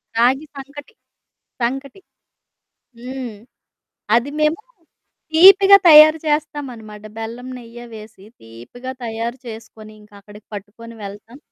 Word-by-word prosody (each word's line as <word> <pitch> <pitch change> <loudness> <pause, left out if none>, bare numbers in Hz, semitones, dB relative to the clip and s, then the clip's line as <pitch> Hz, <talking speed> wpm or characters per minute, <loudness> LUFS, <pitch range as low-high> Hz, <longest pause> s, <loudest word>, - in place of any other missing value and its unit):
రాగి 260 +6 +2
సంకటి, 285 +8 -11 0.7
సంకటి. 270 +7 -3 1.0
హ్మ్. 250 -2 -7 0.8
అది 240 +4 +1
మేమూ 305 +5 +1 0.7
తీపిగా 390 +3 +8
తయారు 310 +1 +8
చేస్తామనమాట. 265 -8 -4 0.2
బెల్లం, 235 +3 -7
నెయ్య 240 0 -12
వేసి 215 -2 -13 0.2
తీపిగా 120 - -10
తయారు 230 +2 -5
చేసుకొని, 220 -1 -11
ఇంకక్కడికి 205 0 -17
పట్టుకొని 220 +3 -10
వెళ్తాం. 205 +6 -11
240 Hz, 95 wpm, -19 LUFS, 215-285 Hz, 1.0 s, తీపిగా